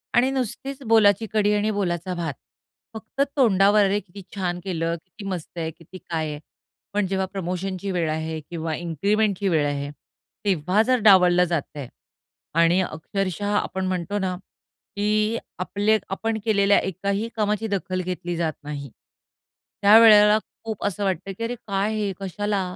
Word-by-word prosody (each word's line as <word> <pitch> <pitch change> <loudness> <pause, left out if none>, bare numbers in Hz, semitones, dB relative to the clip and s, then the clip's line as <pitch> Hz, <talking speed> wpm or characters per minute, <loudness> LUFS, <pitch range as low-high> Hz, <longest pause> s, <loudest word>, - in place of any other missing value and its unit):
आणि 245 +2 +4
नुसतीच 270 +2 -4
"बोलाची 220 -1 +4
कढी 210 -1 +3
आणि 210 +1 +1
बोलाचा 185 -3 -2
भात." 165 -4 -3 0.6
फक्त 220 +4 -5 0.2
तोंडावर, 205 -4 +5
"अरे 200 +1 +1
किती 200 0 -12
छान 180 -3 -2
केलं. 165 -3 -1
किती 200 +3 -12
मस्त 175 -2 -6
आहे! 160 -1 -2
किती 165 +3 -13
काय 160 -3 -3
आहे", 150 0 -6 0.5
पण 205 -1 +1
जेव्हा 190 0 0
प्रमोशनची 185 +1 -3
वेळ 170 -3 0
आहे 160 0 -3
किंवा 165 -2 -3
इन्क्रिमेंटची 200 +5 0
वेळ 155 -4 +2
आहे 145 0 -3 0.6
तेव्हा 185 +1 +2
जर 255 +2 +2
डावललं 180 -3 +7
जातंय 150 -5 -3 0.7
आणि 170 +2 +4
अक्षरशः 195 +4 -2
आपण 190 -2 -2
म्हणतो 185 +2 -2
ना, 185 -2 -1 0.6
की 215 +2 +1 0.2
आपले 205 +4 +1
आपण 220 +3 -2
केलेल्या 200 -2 +4
एकाही 200 +4 -2
कामाची 210 0 0
दखल 185 -2 -2
घेतली 180 -1 -4
जात 160 -2 0
नाही. 145 -1 -6 0.9
त्यावेळेला 210 0 +8 0.3
खूप 220 -3 -5
असं 205 0 -2
वाटतं, 190 0 -2
की 230 - -4
अरे 235 +2 -2
काय 200 +2 0
हे? 210 -2 -1
कशाला? 200 +1 -2
195 Hz, 150 wpm, -24 LUFS, 175-210 Hz, 0.9 s, त्यावेळेला